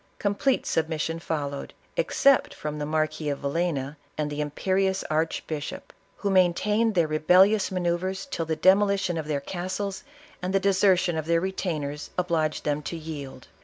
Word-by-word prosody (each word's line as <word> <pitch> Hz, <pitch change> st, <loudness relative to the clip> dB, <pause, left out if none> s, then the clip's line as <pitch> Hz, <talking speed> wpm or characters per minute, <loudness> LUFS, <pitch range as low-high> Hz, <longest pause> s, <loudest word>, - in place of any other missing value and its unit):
Complete 210 Hz, +6 st, +1 dB
submission 160 Hz, 0 st, -1 dB
followed, 145 Hz, -4 st, -4 dB, 0.2 s
except 275 Hz, -, +3 dB
from 150 Hz, 0 st, -5 dB
the 145 Hz, -, -3 dB
Mar 155 Hz, 0 st, +2 dB
quis 155 Hz, -1 st, -3 dB
of 140 Hz, -, -10 dB
Villcnu 145 Hz, -1 st, -1 dB, 0.2 s
and 150 Hz, -1 st, -1 dB
the 145 Hz, +1 st, -2 dB
imperious 190 Hz, +6 st, 0 dB
arehbishop, 155 Hz, -1 st, -3 dB, 0.2 s
who 200 Hz, -, -1 dB
main 180 Hz, -2 st, +4 dB
tained 215 Hz, +3 st, +1 dB
their 170 Hz, -2 st, +4 dB
rebellious 185 Hz, +7 st, +4 dB
manoeuvres 185 Hz, +1 st, -1 dB
till 165 Hz, -, -2 dB
the 160 Hz, -, 0 dB
demolition 195 Hz, 0 st, +3 dB
of 160 Hz, -2 st, -3 dB
their 150 Hz, -2 st, 0 dB
castles 190 Hz, +5 st, -4 dB, 0.4 s
and 185 Hz, +2 st, -2 dB
the -, -, +5 dB
desertion 185 Hz, -3 st, +3 dB
of 155 Hz, -, -5 dB
their 170 Hz, 0 st, +3 dB
retainers, 155 Hz, -6 st, -3 dB
obliged 165 Hz, -4 st, 0 dB
them 150 Hz, 0 st, 0 dB
to 165 Hz, +3 st, -5 dB
yield. 145 Hz, -5 st, -8 dB
170 Hz, 160 wpm, -26 LUFS, 155-190 Hz, 0.4 s, the